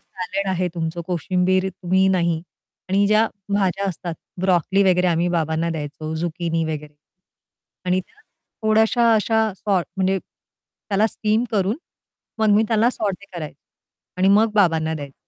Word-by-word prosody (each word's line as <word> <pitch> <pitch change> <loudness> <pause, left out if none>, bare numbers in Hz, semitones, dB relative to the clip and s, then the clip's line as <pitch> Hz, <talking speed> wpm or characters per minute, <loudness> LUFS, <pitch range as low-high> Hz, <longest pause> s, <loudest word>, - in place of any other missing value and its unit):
Salad 195 +2 -4
आहे 180 0 0
तुमचं, 165 0 -3
कोशिंबीर 185 +2 +1
तुम्ही 185 +1 +1
नाही 170 -3 +1 0.5
आणि 200 +1 +3
ज्या 215 +2 +4 0.3
भाज्या 195 0 +1
असतात 170 -1 -5 0.3
ब्रॉकली 190 +1 +2
वगैरे 180 0 +2
आम्ही 170 +1 +1
बाबांना 165 0 0
द्यायचो 155 0 -5
झुकिनी 165 0 -2
वगैरे 150 -1 -5 0.9
आणि 180 +1 +2
त्या 430 - -26 0.4
थोड्याश्या 220 +2 +4
अशा 220 0 +2
सॉर्ट 190 -4 0
म्हणजे 190 0 +1
त्याला 205 +3 -4
स्टीम 220 +2 0
करून 205 +2 +1 0.6
मग 220 -1 +2
मी 220 - +4
त्याला 225 +2 +3
सॉटे 200 -4 -3
करायचे 155 -3 -7 0.5
आणि 185 +1 +3
मग 210 +2 +4
बाबांना 165 -5 +2
द्यायचे. 140 -3 -7
185 Hz, 135 wpm, -22 LUFS, 165-205 Hz, 0.9 s, ज्या